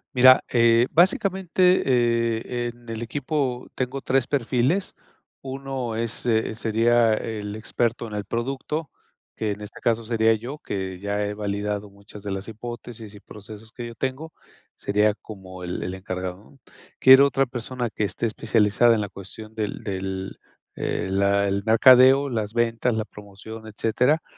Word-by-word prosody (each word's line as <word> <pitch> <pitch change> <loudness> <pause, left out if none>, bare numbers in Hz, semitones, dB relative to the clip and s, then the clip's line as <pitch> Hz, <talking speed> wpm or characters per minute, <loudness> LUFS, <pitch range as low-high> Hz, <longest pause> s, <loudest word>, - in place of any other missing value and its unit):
Mira, 130 +1 +7
eh, 115 0 +4
básicamente, 185 +1 +3
eh, 120 -1 +1
en 120 0 -14
el 115 +1 -4
equipo 130 -1 -2
tengo 130 +1 -3
3 135 -1 +1
perfiles, 135 - 0 0.5
uno 135 -3 -4
es, 115 +1 -3
eh, 110 -2 +1
sería 115 +1 +3
el 105 -1 -4
experto 115 +1 -2
en 105 - -9
el 105 - -3
producto, 135 - -3 0.5
que 110 -1 -2
en 105 +1 -6
este 105 - -9
caso 115 -1 +1
sería 110 0 +2
yo, 120 +7 -5
que 95 -7 -5
ya 100 +1 -2
he 105 0 -3
validado 105 0 -3
muchas 100 +1 -14
de 100 - -4
las 95 +2 -4
hipótesis 115 -1 -8
y 100 - -12
procesos 110 +2 -12
que 120 -1 -7
yo 115 - -7
tengo, 135 +6 -4 0.4
sería 105 +1 +1
como 95 -4 -11
el 90 - -4
el 90 - -4
encargado, 95 -1 -5
¿no? 135 - -21 0.4
Quiero 130 +2 +8
otra 135 0 +1
persona 120 -1 -4
que - - -3
esté 105 - -2
especializada 110 +1 +3
en 105 - -1
la 105 - -4
cuestión 110 +3 -10
del 105 -2 -4
del, 95 -1 -4 0.4
eh, - - -2
la 100 +1 +2
el 100 0 -1
mercadeo, 130 +4 +6
las 110 -3 -3
ventas, 120 0 +1
la 110 0 -2
promoción, 105 +2 -11
etcétera, 125 +8 +1
115 Hz, 160 wpm, -24 LUFS, 105-125 Hz, 0.5 s, Quiero